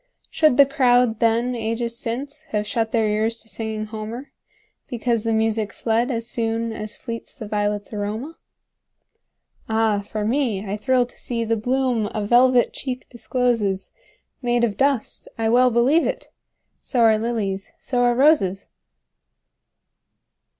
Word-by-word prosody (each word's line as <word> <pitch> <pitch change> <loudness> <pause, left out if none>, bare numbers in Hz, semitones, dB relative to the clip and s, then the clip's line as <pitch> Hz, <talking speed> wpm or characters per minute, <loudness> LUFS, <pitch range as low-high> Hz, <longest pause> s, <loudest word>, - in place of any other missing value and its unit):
Should 310 -6 +3
the 280 - +8
crowd 245 -5 +3
then, 230 +2 +2
ages 230 0 -2
since, 280 +7 -5
Have 210 -7 -2
shut 225 +1 -1
their 225 -2 +2
ears 220 +2 0
to - - -20
singing 220 -1 -4
Homer, 220 +5 -7 0.6
Because 235 -1 -1
the 230 - 0
music 220 -1 0
fled 230 +2 0
as 230 -2 -2
soonAs 225 -2 -2
fleets 230 -2 -7
the 225 -7 -8
violets' 205 0 -2
aroma? 215 +9 -4 1.3
Ah, 220 -2 +2
for 210 +1 -4
me, 225 -5 0
I 200 +1 -3
thrill 250 +3 +2
to 240 - -17
seeThe 230 -2 -2
bloom 250 -3 0
a 210 -1 -1
velvet 245 +2 +4
cheek 255 -2 -5
discloses, 235 -6 -1 0.5
Made 240 -1 +1
of 220 -4 +1
dust—I 235 -3 -1
well 250 +2 +5
believe 250 +8 +3
it! - - -4 0.5
So 245 - 0
are 220 -2 +5
lilies, 210 -4 -2
so 245 -2 -1
are 240 0 +3
roses! 240 - +3
230 Hz, 135 wpm, -22 LUFS, 215-250 Hz, 1.3 s, the